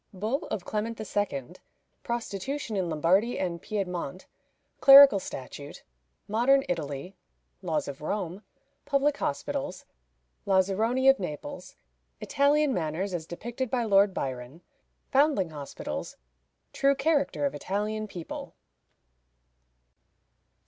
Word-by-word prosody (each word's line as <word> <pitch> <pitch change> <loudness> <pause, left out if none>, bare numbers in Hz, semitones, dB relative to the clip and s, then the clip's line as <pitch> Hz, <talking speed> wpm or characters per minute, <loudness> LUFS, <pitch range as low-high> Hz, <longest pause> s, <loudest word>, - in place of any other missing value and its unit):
Bull 225 - -2
of 180 - -4
Clement 220 +2 -3
II. 205 - -2 0.5
Prostitution 235 +2 -4
in 185 -3 -1
Lombardy 180 +9 +2
and 170 -3 -3
Piedmont. 185 -5 -4 0.5
Clerical 275 -6 +10
Statute. 140 -3 -8 0.4
Modern 250 +6 +3
Italy. 155 +1 -4 0.5
Laws 160 -6 -1
of 140 0 -7
Rome. 185 +3 -3 0.4
Public 285 +1 +1
Hospitals. 285 - -3 0.6
Lazaroni 200 +7 +2
of 270 0 +6
Naples. 190 - -6 0.4
Italian 290 0 +2
Manners 175 +2 -2
as 165 -2 -4
depicted 240 +8 -5
by 245 0 0
Lord 200 -2 +4
Byron. 130 0 -5 0.5
Foundling 270 - +3
Hospitals. 145 -2 -6 0.6
True 275 0 +3
Character 285 0 +1
of 280 - -1
Italian 215 +2 -3
People. 175 -5 -8
205 Hz, 100 wpm, -28 LUFS, 170-270 Hz, 0.6 s, Clerical